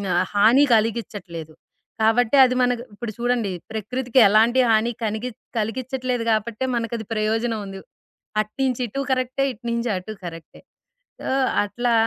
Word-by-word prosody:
ఆహ్, 180 - +2
హాని 230 +8 +5
కలిగిచ్చట్లేదు. 205 -8 -3 0.5
కాబట్టి, 240 +4 +3
అది 255 0 0
మనకు 245 -1 0
ఇప్పుడు 235 0 -5
చూడండి, 240 -5 0 0.2
ప్రకృతికి 250 +4 0
ఎలాంటి 230 +5 +4
హాని 225 +2 +2
కనిగిచ్ 220 +3 -4 0.2
కలిగిచ్చట్లేదు 250 +2 -2
కాబట్టే, 220 +3 -2
మనకది 230 -2 -4
ప్రయోజనవుంది. 215 -2 -1 0.6
అటు 215 0 -8
నించిటూ 255 0 -1
కరక్టే, 255 +1 0
ఇటు 235 +1 -14
నించటూ 220 -4 -2
కరక్టే. 165 -2 -9 0.7
ఆహ్, 265 0 +2 0.2
అట్లా 240 +3 -1
230 Hz, 120 wpm, -23 LUFS, 215-250 Hz, 0.7 s, హాని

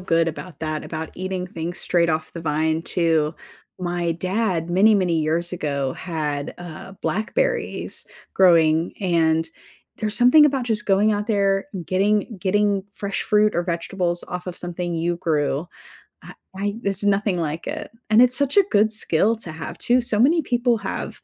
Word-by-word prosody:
good 165 -2 +2
about 165 0 -8
that, 155 -1 -3
about 160 0 -5
eating 185 0 -3
things 170 0 -5
straight 170 -1 +1
off 160 0 -2
the 170 - -7
vine 160 +1 0
too. 165 -3 +1 0.4
My 175 -1 -1
dad, 185 -1 -1
many, 205 +4 +5
many 180 -4 +1
years 165 +3 0
ago 140 -5 -2
had, 150 -4 -4
uh, 175 +2 -9
blackberries 480 - -1 0.3
growing, 165 -3 +4
and 165 -3 +2 0.5
there’s 215 -1 -2
something 250 +5 +7
about 270 -3 -1
just 220 -3 -2
going 205 +2 +3
out 205 0 -2
there 195 -3 +1 0.2
getting 205 +3 0
getting 200 +1 +1
fresh 200 -1 -3
fruit 210 0 +3
or 175 - +1
vegetables 175 0 -2
off 180 +1 -5
of 180 - -5
something 175 0 -4
you 170 +1 -1
grew. 150 -1 -1 0.6
I - - -11 0.3
I - - 0 0.2
there’s 200 0 -2
nothing 200 -2 +1
like 160 0 -3
it. - - -7 0.2
And 220 +2 +6
it’s 250 +1 +4
such 280 +7 0
a 400 - +7
good 215 +1 +4
skill 215 -1 +2
to 170 - -7
have - - -6
too. 245 +1 +5
So 235 -3 0
many 330 +2 +3
people 240 -1 +1
have 195 -1 -4
180 Hz, 165 wpm, -22 LUFS, 165-210 Hz, 0.6 s, something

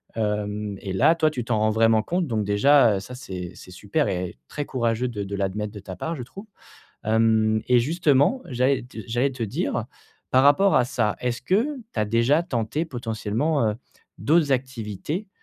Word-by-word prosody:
hem, 105 -1 -2
et 95 - -4
là, 150 - +4
toi, 155 -2 +2
tu 125 -5 -4
t'en 115 -1 0
rends 110 0 +2
vraiment 110 0 +3
compte, 175 +7 -1
donc 110 -5 -1
déjà, 115 +1 +4
heu, - - -2
ça, 125 +6 -9
c'est 90 -8 -7
c'est 90 - -13
super 105 - -1
et 90 -7 -3
très 145 - -4
courageux 120 -1 -1
de 105 -4 -4
de 100 +1 -5
l'admettre 100 +2 -2
de 105 - -8
ta 95 -2 -8
part, 160 - -4
je 130 - -6
trouve, 195 - -11 0.6
hem, 110 0 +2
et 125 -1 +5
justement, 150 - +2
j'allais 130 +1 +1
te 120 -2 -12
j'allais 120 +4 +1
te 125 -3 -4
dire 100 - -2 0.5
par 130 - +5
rapport 145 +8 +5
à 125 - +5
ça, 110 -4 0
est-ce 120 -1 -2
que 190 - +2 0.3
tu - - -2
as - - +2
déjà 115 +9 +2
tenté 130 0 -2
potentiellement, 120 +1 -1
heu, - - -3 0.4
d'autres 155 -1 +2
activités, 130 - -3
120 Hz, 190 wpm, -24 LUFS, 105-140 Hz, 0.6 s, et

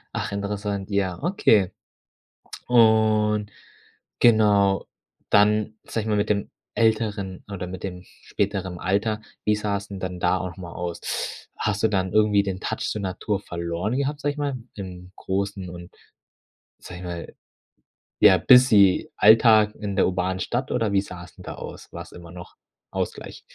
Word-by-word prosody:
Ach, - - -2
interessant. 100 0 -3
Ja, 100 -1 -1
okay, 110 - +3 1.0
und 110 -3 +3 0.7
genau, 105 -4 +4 0.4
dann 105 +1 +3
sage 110 - -3
ich - - -7
mal 105 - +1
mit 105 - 0
dem 100 -1 0 0.2
älteren 105 -4 0
oder 90 -2 -4
mit 95 +1 -8
dem 90 -2 -6
späteren 95 -3 -4
Alter. 105 +4 0 0.2
Wie 105 0 +2
sah 105 -1 -1
es 100 - -11
denn 100 -1 -7
dann 90 -1 -5
da 90 +1 +2
auch 90 0 -6
mal 85 -3 -9
aus? 85 -1 -5 0.6
Hast 105 -1 -1
du 110 - +4
dann 95 -3 -1
irgendwie 105 -1 +4
den 95 -1 -4
touch - - -3
zur 105 - -3
Natur 95 +2 -2
verloren 85 +5 -3
gehabt, 145 +1 -2
sage 145 0 0
ich 150 - -13
mal, 140 -3 -1 0.2
im 90 -2 -9
großen 95 -1 -3
und 85 0 -10 0.9
sage 90 0 -10
ich - - -8
mal, 85 -1 -7 0.8
ja, 95 - +7
busy 110 -5 +6
Alltag 110 -1 +6
in 100 -2 -5
der 100 - +3
urbanen 95 0 -1
Stadt 125 +6 -2
oder 115 -4 0
wie 100 -1 +3
sah 90 -3 -9
es 80 -5 -15
denn - - -13
da - - -6
aus? - - -10
War - - -6
's - - -17
immer 85 -1 -12
noch 90 -1 -11 0.3
Ausgleich. - - -5
100 Hz, 165 wpm, -24 LUFS, 95-110 Hz, 1.0 s, ja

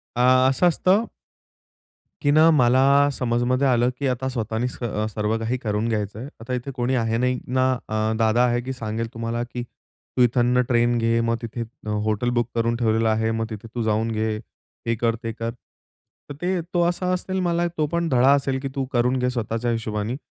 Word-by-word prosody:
आ, 130 +1 +5
असं 135 +7 +3
असतं 185 +6 +3 1.2
की 145 - +2
ना, 155 +2 +6
मला 140 +1 +4
समजमध्ये 125 +2 +1
आलं 120 -1 +3
की 140 - 0
आता 130 +2 -4
स्वतःनीच 115 0 -3
अ, 110 -2 -1
सर्व 105 +1 -1
काही 115 +3 -1
करून 110 -1 -2
घ्यायचं 105 -1 -2
आहे. 125 - -6
आता 115 +3 -5
इथे 125 +2 -3
कोणी 125 +1 0
आहे 115 -1 0
नाही 125 +1 0
ना, 130 +1 +2 0.2
अ, 110 +1 0
दादा 115 +2 +3
आहे 120 0 +1
की 130 +2 -5
सांगेल 115 -1 -4
तुम्हाला 115 +1 -3
की 120 0 -6
"तू 125 +1 -8
इथंन 120 +1 +3
ट्रेन 120 -1 +2
घे, 115 0 +2
मग 115 0 +1
तिथे 115 0 -5
अ, 115 0 -8 0.2
हॉटेल 110 +3 0
बुक 120 0 -1
करून 115 0 +1
ठेवलेलं 115 -1 +1
आहे, 110 +1 +1
मग 115 0 -1
तिथे 110 0 -8
तू 120 - -1
जाऊन 110 +1 0
घे, 110 0 -1 0.5
हे 115 - +2
कर, 115 0 0
ते 115 - -2
कर." 115 0 -4 0.8
तर - - -5
ते 180 0 0
तो 175 - +2
असा 180 +1 -1
असेल 185 +1 -2
मला 170 0 +1
तो 155 -1 +1
पण 170 -1 0
धडा 130 +2 +4
असेल 135 -1 0
की 135 - -3
तू 135 -1 -1
करून 125 +2 +2
घे 125 0 +1
स्वतःच्या 120 -1 -2
हिशोबानी. 110 +1 -2
120 Hz, 200 wpm, -23 LUFS, 115-130 Hz, 1.2 s, ना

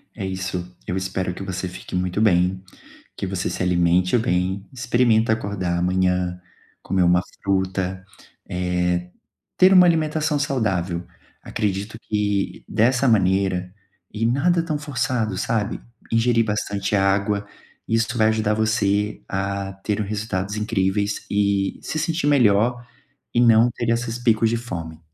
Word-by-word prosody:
É 100 - -4
isso! 90 -1 -4
Eu 90 - -2
espero 95 -1 -2
que 90 - -9
você 95 -1 -4
fique 90 - -8
muito 90 +1 -1
bem, 95 -3 +2 0.5
que 100 - -4
você 90 -1 -2
se - - -4
alimente 90 +3 +3
bem, 95 -2 -1
experimenta 120 -3 +2
acordar 100 -5 -2
amanhã, 90 0 0 0.4
comer 95 -1 +1
uma 90 0 +4 0.2
fruta, 95 -1 -1 0.4
eh, 90 0 -1 0.5
ter 185 +1 +6
uma 180 -1 +8
alimentação 155 -2 +1
saudável. 95 - -1 0.4
Acredito 105 +2 -3
que 105 -2 -1
dessa 125 +4 +2
maneira, 95 -3 +2 0.4
e 110 +2 -1
nada 165 +8 +2
tão 155 -3 -2
forçado, 125 -8 -2
sabe? 110 -3 -1 0.3
Ingerir 115 0 +3
bastante 105 -1 -1
água, 100 +1 +1 0.4
isso 115 +1 0
vai 110 -1 +4
ajudar 110 -1 +1
você 105 -1 0
a 100 0 -3
ter 105 0 -1
o - - 0
resultados 105 -1 -3
incríveis 105 -1 -1
e 100 -1 0
se 155 - -3
sentir 165 -1 -1
melhor 120 -2 +3 0.5
e 120 - +2
não 115 0 +6
ter 120 0 -3
esses 115 0 -1
picos 115 -2 +3
de 115 - 0
fome. 85 -9 -6
100 Hz, 135 wpm, -22 LUFS, 95-115 Hz, 0.5 s, uma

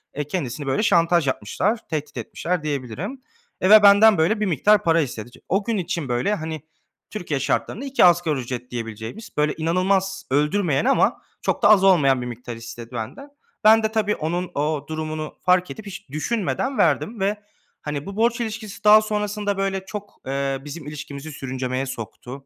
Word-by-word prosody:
eee, 150 - -1
kendisini, 145 -4 -4
böyle, 135 +10 +1
şantaj 170 -5 +3
yapmışlar, 185 - -1
tehdit 150 -2 -4
etmişler 180 -2 -3
diyebilirim. 150 - -4 0.4
Eee, 185 - +2
ve 215 0 +9
benden, 205 0 +7
böyle, 180 +7 +2
bir 210 - +1
miktar 205 +4 +3
para 165 0 +3
istedi. 120 -4 -5
T - - -17
o 195 +3 +1
gün 230 0 -1
için, 170 -6 -3
böyle, 120 +12 +1
hani, 160 -3 -5 0.5
Türkiye 175 -9 -3
şartlarında 135 - -1
2 270 -7 +4
asgari 170 -5 +3
ücret 125 0 -6
diyebileceğimiz, 115 - -6
böyle, 150 0 +2
inanılmaz 190 +4 0
öldürmeyen 150 - +1
ama 270 - +2 0.2
çok - - -1
da - - +7
az 205 -3 +6
olmayan 145 -9 +4
bir 125 - -4
miktar 120 0 -7
istedi 115 +1 -9
benden. 125 - -6 0.3
Ben 220 +1 +6
de 220 - 0
tabii 215 -2 +1
onun 175 +3 -3
o 150 0 -1
durumunu 155 -1 -4
fark 180 0 +2
edip, 220 - -9
hiç 200 -3 -9
düşünmeden 230 - -2
verdim 220 +1 +1
ve, 200 +2 0 0.4
hani, 150 -1 -4
bu 200 0 -7
borç 235 +2 +1
ilişkisi 220 -3 -6
daha 215 +1 +8
sonrasında, 210 -1 -2
böyle, 195 -1 -2
çok, 205 +1 -7
eee, 135 0 -2
bizim 145 0 -8
ilişkimizi 150 0 -7
sürüncemeye 130 -1 -3
soktu. 130 +2 -8
165 Hz, 175 wpm, -23 LUFS, 140-205 Hz, 0.5 s, ve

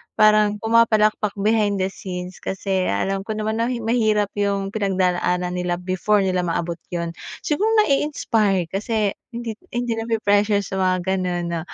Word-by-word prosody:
parang 215 -1 +5
pumapalakpak 215 -2 +3
behind 210 -2 +2
the 190 - +1
scenes, 180 -1 -7
kasi 190 -1 -2
alam 195 - -1
ko 220 - -3
naman 215 +1 -2
na 230 - +2 0.2
mahirap 220 -3 +1
yung 200 -1 0
pinagdadaanan 180 -3 0
nila 180 -1 -1
before 185 +3 +1
nila 185 -1 0
maabot 170 0 -2 0.2
yun. 170 -1 -2 0.3
Siguro 370 +9 +1 0.2
nai-inspire, 220 - +1
kasi 210 +1 0 0.2
hindi 235 -1 -4 0.2
hindi 240 -2 -1
na 225 - -4 0.2
pressure 205 0 +3
sa 190 -1 -4
mga 185 -1 +2 0.2
ganun 175 -1 -2
na, 170 - -1
200 Hz, 150 wpm, -22 LUFS, 185-220 Hz, 0.3 s, parang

